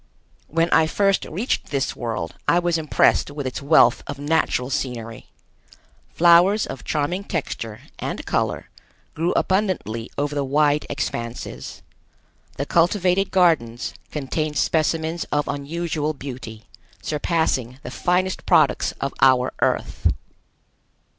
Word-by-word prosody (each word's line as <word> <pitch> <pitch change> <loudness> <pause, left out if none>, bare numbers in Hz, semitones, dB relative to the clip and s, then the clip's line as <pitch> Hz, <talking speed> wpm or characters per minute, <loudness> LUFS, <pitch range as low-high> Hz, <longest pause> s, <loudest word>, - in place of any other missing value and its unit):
When 165 +2 +1
I 160 -1 +5
first 195 +3 +1
reached 210 +10 -2
this 140 -2 -1
world 110 -9 -4
I 170 - +4
was 175 -1 +1
impressed 155 -2 +2
with 145 -1 -6
its 130 +3 -4
wealth 140 -4 +5
of 140 - -5
natural 145 -3 0
scenery. 115 -4 -4 0.8
Flowers 175 +5 +5
of 135 - -7
charming 155 +6 -1
texture 115 - -4 0.2
and - - -4
color - - -1 0.4
grew 170 +3 0
abundantly 185 - 0
over 145 +1 -1
the 145 -1 0
wide 145 +2 +2
expanses. 115 - -5 0.7
The 140 - -2
cultivated 180 +4 +2
gardens 150 -11 +2 0.2
contained 150 +1 -3
specimens 160 +1 0
of 145 0 -1
unusual 155 +1 -2
beauty, 125 -5 -8 0.4
surpassing 145 -5 -1
the 125 - -7
finest 185 +5 0
products - - +3
of - - -4
our 130 -1 +4
Earth. - - 0
150 Hz, 120 wpm, -22 LUFS, 130-170 Hz, 0.8 s, I